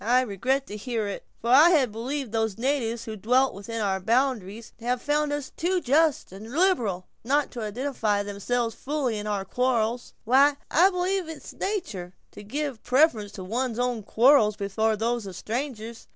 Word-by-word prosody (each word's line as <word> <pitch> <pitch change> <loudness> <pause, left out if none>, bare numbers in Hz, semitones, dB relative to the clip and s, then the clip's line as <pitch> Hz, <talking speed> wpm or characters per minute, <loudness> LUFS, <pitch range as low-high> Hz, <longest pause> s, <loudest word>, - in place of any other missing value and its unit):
"I 245 +4 +4
regret 255 +5 -1
to 210 - -8
hear 225 -1 -2
it; 200 - -6
for 235 - -1
I 295 +6 +8
had 280 -9 +3
believed 250 +3 -4
those 220 -3 -1
natives 235 -2 -1
who 220 -2 -5
dwelt 250 +6 +2
within 220 +4 -5
our 195 -2 0
boundaries 230 -1 -1
had 245 +2 -1
found 295 +2 0
us 290 -2 -4
too 365 +2 0
just 300 - +2
and 210 +4 -10
liberal, 245 - +1 0.2
not 285 +5 +1
to 240 - -6
identify 215 -2 -1
themselves 225 +4 -2
fully 260 -2 -2
with 210 - -5
our 200 -2 -2
quarrels." 240 +1 -1
"Why, 275 +5 +5 0.2
I 355 +5 +6
believe 365 -1 -1
it 320 - -6
is - - -10
natur' 205 - -4 0.2
to - - -11
give 275 +4 -3
a - - -38
preference 245 -6 +2
to 190 - -7
one's 235 +4 -2
own 245 -2 -1
quarrels 225 0 +4
before 215 +2 0
those 230 0 -1
of 190 - -8
strangers. 230 -2 -5
240 Hz, 180 wpm, -26 LUFS, 215-280 Hz, 0.2 s, I